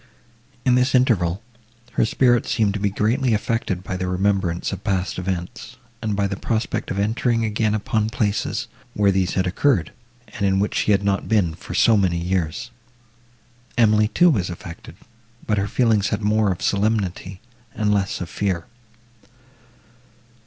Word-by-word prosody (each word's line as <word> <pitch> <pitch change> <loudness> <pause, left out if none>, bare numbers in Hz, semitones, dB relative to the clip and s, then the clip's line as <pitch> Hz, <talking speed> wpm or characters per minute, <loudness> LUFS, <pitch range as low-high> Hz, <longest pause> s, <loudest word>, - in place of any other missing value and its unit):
In 125 - +4
this 125 +1 +3
interval, 105 -7 +2 0.5
her 115 - +2
spirits 120 +1 +2
seemed 105 -4 +1
to 105 - -3
be 100 0 +1
greatly 115 +4 +1
affected 105 -4 -2
by 90 - -4
the 90 0 -3
remembrance 90 -2 0
of - - -6
past 95 -2 -1
events, 90 -1 -5 0.2
and 110 -2 -1
by 100 0 +1
the 100 0 -2
prospect 110 +3 -2
of 95 - -3
entering 115 +3 +1
again 110 0 0
upon 110 0 0
places, 110 -3 -1 0.3
where 100 -1 +3
these 95 -1 0
had 95 - +1
occurred, 90 - +1 0.4
and 105 0 -6
in 95 -1 +2
which 105 - 0
she - - +1
had 100 0 +3
not 100 -1 0
been 100 -7 +2
for 85 - -8
so 115 -2 +5
many 90 -4 +1
years. 90 +7 -2 1.1
Emily 110 -2 +4
too 175 +11 +4
was 95 - 0
affected, 85 -1 -9 0.5
but 105 -2 +1
her 100 - -1
feelings 110 -4 +2
had 110 - -2
more 105 -1 +2
of 90 - -4
solemnity, 100 -3 -1 0.4
and 105 -1 +1
less 100 -2 -1
of 90 - -4
fear. 95 -5 -1
100 Hz, 160 wpm, -22 LUFS, 95-110 Hz, 1.1 s, so